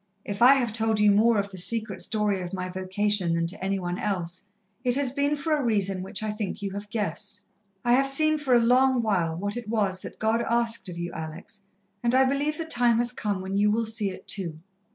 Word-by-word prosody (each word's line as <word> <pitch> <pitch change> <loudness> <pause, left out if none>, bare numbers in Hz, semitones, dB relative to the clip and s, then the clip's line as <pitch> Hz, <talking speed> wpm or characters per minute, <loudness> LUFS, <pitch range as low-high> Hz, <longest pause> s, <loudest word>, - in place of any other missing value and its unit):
"If 205 +2 -5
I 255 +3 +8
have 240 -5 -1
told 220 -1 +1
you 210 -1 +5
more 220 +3 +4
of 200 0 -1
the 190 - -2
secret 220 +4 0
story 210 -3 0
of 180 +1 -5
my 185 0 -4
vocation 190 -1 0
than 170 0 0
to 180 +3 -6
any 195 +1 0
one 175 0 -4
else, 185 -4 -3 0.4
it 250 -1 +2
has 275 -2 0
been 285 +2 0
for 305 +2 0
a 295 - -2
reason 195 -5 0
which 190 +3 -3
I 215 - -1
think 210 -2 -4
you 200 - -3
have 205 +1 -7
guessed. 205 0 -1 0.4
I 240 - +4
have 270 +2 +4
seen 310 +3 +3
for 265 -4 +2
a - - +6
long 250 +1 +3
while 175 -7 0
what 205 +5 -3
it 240 -3 -6
was 200 -4 0
that - - -9
God 220 +1 +1
asked 235 -3 0
of 175 - -7
you, 175 0 -4
Alex, 160 +6 -8 0.4
and 240 +1 +1
I 265 - +6
believe 280 +3 0
the 330 - -4
time 245 -6 +3
has 240 +1 +1
come 205 -6 -3
when 190 +1 -3
you 205 +1 +3
will 225 +2 +1
see 220 -2 -1
it 185 - -10
too. 170 -6 -3
210 Hz, 235 wpm, -26 LUFS, 190-240 Hz, 0.4 s, I